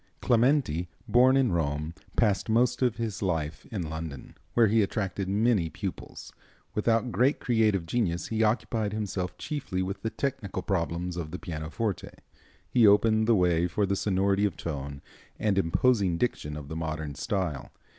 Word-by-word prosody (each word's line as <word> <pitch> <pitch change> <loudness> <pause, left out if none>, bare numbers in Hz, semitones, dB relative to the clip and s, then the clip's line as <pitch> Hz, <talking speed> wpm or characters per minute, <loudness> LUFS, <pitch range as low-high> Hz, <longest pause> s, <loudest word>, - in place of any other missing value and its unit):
Clementi, 120 - +2 0.2
born 130 +2 +5
in 130 -5 +3
Rome, 75 -1 -1 0.2
passed 105 -2 +2
most 125 +3 +2
of 125 -3 +2
his 115 -4 -4
life 80 -5 -2
in 95 -7 -4
London, 80 -3 -6 0.2
where 120 - +6
he 110 +1 +3
attracted 100 -2 -2
many 105 -4 +2
pupils. - - -7 0.4
Without 115 +3 +1
great 130 +6 +2
creative 110 -7 +2
genius, 85 -3 -1
he 110 0 0
occupied 110 -1 0
himself 100 -4 -3
chiefly 130 -12 -3
with 95 +2 -4
the 110 - -1
technical 115 -6 -3
problems 90 -2 -2
of 80 -3 -4
the 90 - -5
pianoforte. 85 +6 -4 0.6
He 115 -3 +5
opened 110 +2 +4
the 115 - +5
way 90 -2 +3
for 100 +4 0
the 100 0 0
sonority 100 0 +1
of 100 -6 0
tone 70 -3 -5 0.3
and 105 -2 +1
imposing 95 0 +2
diction 75 -9 -2
of 75 -2 -8
the 80 - -6
modern 80 -2 -3
style. 85 -3 -2
100 Hz, 155 wpm, -28 LUFS, 85-115 Hz, 0.6 s, where